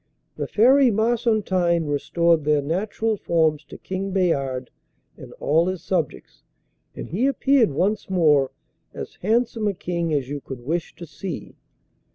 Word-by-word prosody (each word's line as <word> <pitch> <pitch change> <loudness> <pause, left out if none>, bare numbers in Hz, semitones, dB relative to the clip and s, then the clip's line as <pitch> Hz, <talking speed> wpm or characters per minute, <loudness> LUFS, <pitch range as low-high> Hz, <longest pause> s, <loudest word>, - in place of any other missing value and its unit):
The - - -4
Fairy 260 +4 +5
Marsontine 215 -7 +1
restored 165 +2 +1
their 150 -1 +2
natural 210 +7 -1
forms 160 -4 +1
to - - -11
King 190 +1 -4
Bayard 140 -9 -1 0.4
and - - -12
all 160 +4 +1
his 185 -2 -3
subjects, 170 -7 -3 0.5
and - - -7
he 220 - +1
appeared 275 -4 +3
once 195 +10 -1
more 150 -7 +3 0.5
as - - -7
handsome 225 +1 +1
a 200 - -1
king 170 -2 -2
as 140 -4 0
you 145 +1 -5
could 130 -2 -8
wish 165 +3 -2
to 170 - -9
see. 175 +1 -7
175 Hz, 145 wpm, -23 LUFS, 150-215 Hz, 0.5 s, Fairy